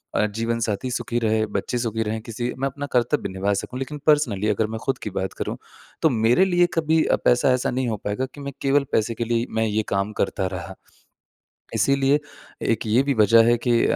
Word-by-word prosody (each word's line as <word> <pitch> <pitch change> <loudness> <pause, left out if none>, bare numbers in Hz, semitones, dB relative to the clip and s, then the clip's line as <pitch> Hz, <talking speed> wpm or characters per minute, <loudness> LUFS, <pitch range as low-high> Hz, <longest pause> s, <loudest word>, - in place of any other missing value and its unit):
अ, - - +3
जीवनसाथी 115 +2 -2
सुखी 120 0 -2
रहे, 110 -1 +1
बच्चे 105 +3 -3
सुखी 115 -2 -1
रहें, 110 +1 -3
किसी 120 +2 -4
मैं 135 - +1
अपना 140 +1 -5
कर्तव्य 125 +2 +1
निभा 100 +2 0
सकूँ। 125 +6 -4
लेकिन 140 +3 -5
पर्सनली 125 -10 +3
अगर 105 +1 +1
मैं 110 +1 -5
खुद 135 -1 0
की - - -3
बात 95 -1 -3
करूँ, - - -4 0.4
तो 160 - +5
मेरे 120 +7 +3
लिए 175 -2 +3
कभी 160 -1 +2
अ, - - +3
पैसा 125 +2 +4
ऐसा 125 - 0
नहीं 130 0 -1
हो 110 - -2
पाएगा 105 +6 -1
कि 145 - -9
मैं 140 0 -6
केवल 140 0 +2
पैसे 110 +1 +1
के 120 - -2
लिए 120 +1 +1
ही 115 - -1
मैं 110 0 +2
ये 110 0 0
काम 100 +1 0
करता 95 -1 0
रहा। 95 +2 -8 1.0
इसीलिए 140 +1 +3 0.5
एक 115 - -1
ये 110 +4 +4
भी 140 0 +1
वजह 115 0 +6
है 120 0 +4
कि 120 -1 +4
अ, - - +1
115 Hz, 220 wpm, -23 LUFS, 110-135 Hz, 1.0 s, वजह